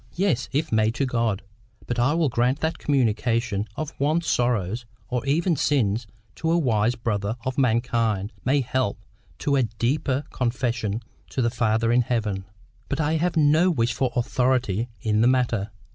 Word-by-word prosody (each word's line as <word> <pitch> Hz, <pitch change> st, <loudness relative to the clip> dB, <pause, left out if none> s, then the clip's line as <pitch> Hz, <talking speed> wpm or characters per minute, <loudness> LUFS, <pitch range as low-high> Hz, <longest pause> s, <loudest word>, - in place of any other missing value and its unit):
"Yes, 175 Hz, -10 st, 0 dB
if 155 Hz, +3 st, -1 dB
made 110 Hz, +1 st, +2 dB
to 135 Hz, -, +1 dB
God. 115 Hz, -6 st, 0 dB, 0.4 s
But 120 Hz, 0 st, -2 dB
I 135 Hz, +6 st, +3 dB
will 165 Hz, -2 st, +2 dB
grant 125 Hz, +3 st, +1 dB
that 160 Hz, +1 st, -1 dB
communication 115 Hz, -5 st, +1 dB
of 155 Hz, -1 st, -4 dB
one's 155 Hz, +4 st, +1 dB
sorrows 120 Hz, -, 0 dB, 0.3 s
or 125 Hz, -2 st, -1 dB
even 165 Hz, +4 st, +2 dB
sins 115 Hz, -6 st, +1 dB, 0.3 s
to 160 Hz, -, -1 dB
a 170 Hz, -, +3 dB
wise 120 Hz, -6 st, +2 dB
brother 110 Hz, -3 st, -2 dB
of 130 Hz, +1 st, -1 dB
mankind 115 Hz, -4 st, +1 dB
may 140 Hz, +2 st, +2 dB
help 125 Hz, -3 st, -1 dB, 0.4 s
to 140 Hz, -, 0 dB
a 135 Hz, -, +3 dB
deeper 130 Hz, +4 st, 0 dB
confession 120 Hz, -3 st, -1 dB, 0.3 s
to 130 Hz, -, -1 dB
the 115 Hz, -, +1 dB
Father 115 Hz, -1 st, +1 dB
in 125 Hz, +1 st, +4 dB
heaven. 105 Hz, -5 st, -1 dB, 0.4 s
But 140 Hz, -, -2 dB
I 155 Hz, +1 st, +1 dB
have 170 Hz, +1 st, 0 dB
no 155 Hz, +4 st, +5 dB
wish 120 Hz, -8 st, +1 dB
for 130 Hz, -2 st, 0 dB
AUTHORITY 125 Hz, -3 st, +1 dB
in 110 Hz, -1 st, +1 dB
the 120 Hz, -, +5 dB
matter. 120 Hz, -5 st, +1 dB
125 Hz, 165 wpm, -24 LUFS, 115-140 Hz, 0.4 s, no